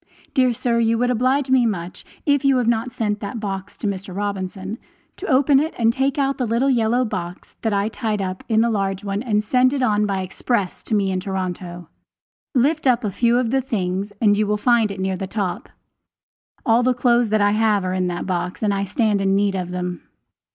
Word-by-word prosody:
Dear 255 -1 +3
sir, 235 0 0
you 230 0 +2
would 245 +1 +1
oblige 255 +3 +1
me 250 -2 +4
much, 180 -4 -4 0.2
if 285 -1 +2
you 275 -1 +4
have 245 -2 0
not 235 +1 +1
sent 210 -3 -2
that 220 +3 -5
box 195 -2 -5
to - - -6
Mr. 190 -2 -4
Robinson, 195 +1 -4 0.4
to 405 - -6
open 270 +1 +4
it 315 +3 -2
and 230 -1 +3
take 270 +2 0
out 275 -1 0
the 250 - 0
little 240 +5 +2
yellow 240 +1 +2
box 180 -4 -6
that 220 - 0
I 200 0 +1
tied 220 -1 -2
up 185 -1 -4
in 220 -1 +3
the 235 0 +2
large 195 -2 -1
one 200 0 -2
and 215 -4 0
send 255 +4 +3
it 270 -2 0
on 210 -3 +2
by 195 -1 -1
express 195 +1 -2
to 220 - 0
me 195 -2 +1
in 185 - -1
Toronto. 180 -2 -5 0.7
Lift 285 +4 +2
up 250 -1 +3
a 210 - -1
few 235 +4 +2
of 245 -2 0
the 265 0 +2
things 195 -4 -2
and 205 -2 +4
you 210 0 +1
will 210 0 +1
find 230 0 +3
it 200 -1 -6
near 190 0 -1
the 190 - -4
top. 195 -3 -3 1.0
All 230 -1 +4
the 250 0 +2
clothes 240 -2 +3
that 215 0 +2
I 205 0 +4
have 210 -2 +2
are 185 - -1
in 185 -1 0
that 175 -1 -3
box 180 +1 -3
and 205 -1 +2
I 200 0 -1
stand 210 0 +1
in 195 0 +2
need 200 0 +2
of 180 -2 -3
them. 180 -1 -4
215 Hz, 225 wpm, -21 LUFS, 195-245 Hz, 1.0 s, me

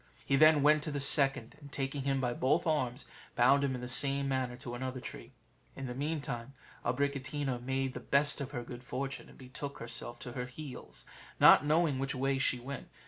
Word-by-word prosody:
He 135 - +2
then 155 0 +6
went 150 +1 +5
to 150 - -4
the 145 - -2
second, 135 -3 +2
and 140 -1 -12
taking 135 0 -2
him 135 -1 +1
by 125 -2 0
both 145 +8 +1
arms, 130 -5 -1 0.3
bound 140 +4 +5
him 135 -2 0
in 125 - -6
the 125 - -5
same 140 +2 +3
manner 130 -2 -1
to 125 -2 -7
another 130 +1 -4
tree. - - -9 0.4
In 135 - -6
the 125 - -4
meantime 135 -3 -4 0.3
Abricotina 135 0 -1
made 130 +1 -1
the - - -5
best 145 +1 +2
of 140 - -4
her 120 -4 -5
good 120 +1 -9
fortune, 135 +2 -5
and - - -16
betook 140 +2 -6
herself 120 0 -4
to 125 - -6
her 125 0 -4
heels, 135 +1 -10 0.3
not 145 - +8
knowing 155 -3 +2
which 135 0 -2
way 135 +1 0
she 125 -1 +1
went. 130 +1 -7
135 Hz, 200 wpm, -32 LUFS, 125-140 Hz, 0.4 s, not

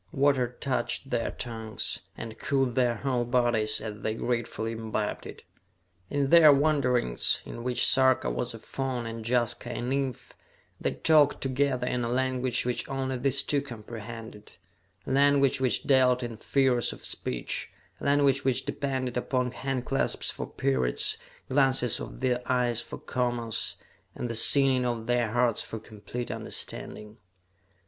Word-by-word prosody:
Water 135 -5 +1
touched 135 0 -2
their 115 - 0
tongues, 110 -3 -4 0.2
and 115 0 -8
cooled 135 -3 +1
their 120 -2 +2
whole 125 0 -1
bodies 120 -3 +1
as 105 -1 -7
they 110 +1 -1
gratefully 115 -1 -2
imbibed 110 -2 -3
it. - - -11 0.7
In 140 -1 0
their 165 -3 +9
wanderings, 135 - +2
in 115 - -7
which 125 -1 +2
Sarka 130 - +4
was - - -3
a - - -7
faun 130 -3 -3
and 115 0 -6
Jaska 120 0 0
a 120 - -4
nymph, 130 +1 -3 0.5
they - - -1
talked 150 -3 +4
together 130 -1 0
in 125 -1 -1
a 115 - -1
language 130 -1 0
which 125 -1 -2
only 135 -1 -2
these 135 +2 +1
two 145 -1 +1
comprehended 115 -3 -9 0.5
a - - -4
language 140 -1 +4
which 130 -2 +2
dealt 130 -2 +4
in 120 -1 -5
figures 125 +1 +1
of - - -10
speech, 60 -1 -4 0.3
a - - -7
language 140 -1 +3
which 130 -2 +1
depended 130 -3 -2
upon 125 0 0
handclasps 135 0 -1
for - - -5
periods, 65 -2 0 0.3
glances 130 -3 +2
of - - -8
the 125 -1 +1
eyes 120 -2 +2
for - - -8
commas, 120 -3 -2 0.4
and 120 - -3
the - - -3
singing 130 +2 +5
of 120 -2 -2
their 120 -1 +1
hearts 120 -2 +2
for 110 - -5
complete 110 +3 -7
understanding. 105 +1 -6
125 Hz, 150 wpm, -28 LUFS, 115-135 Hz, 0.7 s, their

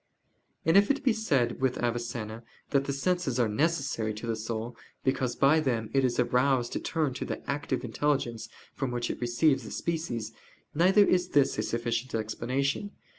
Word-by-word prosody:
And 165 - +4
if 200 0 +5
it 280 0 +1
be 250 - +4
said 140 - 0
with 130 -1 +1
Avicenna, 115 -2 -3 0.3
that 140 -1 +2
the 140 - -1
senses 140 -2 0
are 120 - +3
necessary 130 -4 0
to 110 - -6
the 115 -1 -1
soul, 110 +2 -4 0.3
because 130 -2 0
by 145 +4 +4
them 120 -7 -1
it 135 -1 +3
is 125 -1 +1
aroused 125 0 +2
to - - -1
turn 155 -5 -1
to - - -4
the - - -6
"active 140 -3 -2
intelligence" 120 -3 -1 0.2
from 135 -2 -2
which 120 -1 -2
it - - -7
receives 130 +4 +2
the - - -9
species: 140 -10 -3 0.4
neither 190 +6 +5
is 180 -2 +2
this 145 -2 +2
a - - +3
sufficient 120 +2 -2
explanation. 130 - -2
130 Hz, 175 wpm, -29 LUFS, 120-150 Hz, 0.4 s, if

